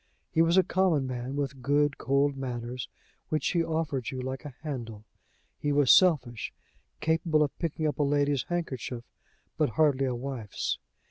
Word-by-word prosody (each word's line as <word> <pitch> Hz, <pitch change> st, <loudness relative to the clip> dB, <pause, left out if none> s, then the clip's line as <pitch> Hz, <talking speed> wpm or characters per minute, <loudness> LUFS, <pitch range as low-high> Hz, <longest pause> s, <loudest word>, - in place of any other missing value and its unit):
He 160 Hz, -, +3 dB
was 165 Hz, +2 st, +4 dB
a 190 Hz, -, +7 dB
common 175 Hz, -8 st, +2 dB
man, 130 Hz, +1 st, -4 dB
with 140 Hz, -2 st, -3 dB
good 145 Hz, +2 st, +2 dB
cold 140 Hz, +1 st, +2 dB
manners, 125 Hz, -2 st, -4 dB, 0.4 s
which 155 Hz, -, +1 dB
he 170 Hz, -2 st, +2 dB
offered 160 Hz, -6 st, -1 dB
you 130 Hz, -, -5 dB
like 130 Hz, +3 st, -4 dB
a 140 Hz, -4 st, -8 dB
handle. 115 Hz, -8 st, -5 dB, 0.6 s
He 145 Hz, -, 0 dB
was 145 Hz, -2 st, +5 dB
selfish, 130 Hz, -, +4 dB, 0.5 s
capable 160 Hz, -1 st, +2 dB
of 145 Hz, -, -2 dB
picking 160 Hz, -1 st, -2 dB
up 150 Hz, -, -1 dB
a -, -, +4 dB
lady's 145 Hz, -1 st, +1 dB
handkerchief, 130 Hz, -8 st, -3 dB, 0.6 s
but 150 Hz, -, +3 dB
hardly 145 Hz, -4 st, +4 dB
a 125 Hz, -, -1 dB
wife's. 120 Hz, -, -3 dB
140 Hz, 160 wpm, -29 LUFS, 130-155 Hz, 0.6 s, a